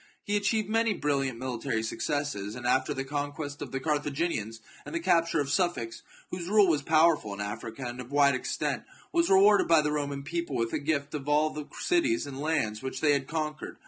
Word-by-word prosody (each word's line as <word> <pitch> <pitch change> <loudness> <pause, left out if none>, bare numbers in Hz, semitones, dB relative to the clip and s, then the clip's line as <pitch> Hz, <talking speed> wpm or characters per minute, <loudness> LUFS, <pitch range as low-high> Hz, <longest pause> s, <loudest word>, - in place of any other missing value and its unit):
He 205 - -1
achieved 205 +1 +1
many 225 0 +2
brilliant 135 -6 -1
mili 125 -2 -4
tary 110 -1 -1
successes, 115 -4 -2
and 120 -1 -7
after 130 +1 +2
the 135 - -2
conquest 145 +1 -4
of - - -6
the 135 - -2
Car 150 +2 +1
thaginians, 140 -7 -2 0.2
and - - -7
the - - +1
capture 165 - +2
of 140 -1 -1
Sufax, 145 -10 0 0.3
whose 180 -1 -4
rule 210 -1 +6
was 155 -4 +2
powerful 155 -8 +3
in - - -11
Africa, 110 +4 -5
and 120 +1 -5
of 125 +2 -11
wide 140 -1 +5
extent, 130 - -2 0.3
was 340 -1 +2
rewarded 200 +2 +6
by 165 -2 +6
the 150 - 0
Roman 140 -2 -2
people 170 -1 -3
with 115 -1 -1
a - - 0
gift 140 -1 -1
of 145 -1 -4
all 150 +1 +3
the 150 -1 -6
cities 340 -1 +1
and 135 -1 -7
lands 145 -9 0
which 130 0 -4
they 150 -2 +4
had 140 -1 -1
conquered. 155 -1 -4
145 Hz, 210 wpm, -28 LUFS, 130-170 Hz, 0.3 s, rule